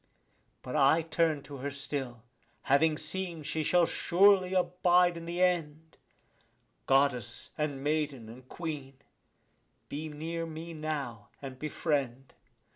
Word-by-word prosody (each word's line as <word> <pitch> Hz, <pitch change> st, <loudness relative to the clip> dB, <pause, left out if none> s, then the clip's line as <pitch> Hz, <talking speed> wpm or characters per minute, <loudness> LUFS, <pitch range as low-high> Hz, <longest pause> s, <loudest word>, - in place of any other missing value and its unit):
But 125 Hz, -, -5 dB
I 155 Hz, +5 st, +4 dB
turn 160 Hz, -2 st, 0 dB
to 140 Hz, 0 st, -9 dB
her 140 Hz, +2 st, -3 dB
still, 135 Hz, -4 st, -5 dB, 0.4 s
having 150 Hz, +3 st, +3 dB
seen 170 Hz, 0 st, -2 dB
she 155 Hz, +2 st, -2 dB
shall 175 Hz, +3 st, +4 dB
surely 185 Hz, +2 st, +4 dB
abide 180 Hz, -1 st, +3 dB
in 165 Hz, 0 st, -7 dB
the 175 Hz, +2 st, 0 dB
end; 160 Hz, -3 st, -1 dB, 0.9 s
Goddess 130 Hz, -4 st, +1 dB
and 145 Hz, -3 st, -2 dB
maiden 145 Hz, -5 st, -1 dB
and 125 Hz, +3 st, -13 dB
queen, 150 Hz, -5 st, -6 dB, 0.9 s
be 155 Hz, +2 st, -5 dB
near 165 Hz, +2 st, -4 dB
me 165 Hz, +1 st, -7 dB
now 140 Hz, -9 st, -4 dB
and 135 Hz, -2 st, -8 dB
befriend. 140 Hz, -4 st, -2 dB
155 Hz, 120 wpm, -30 LUFS, 135-165 Hz, 0.9 s, I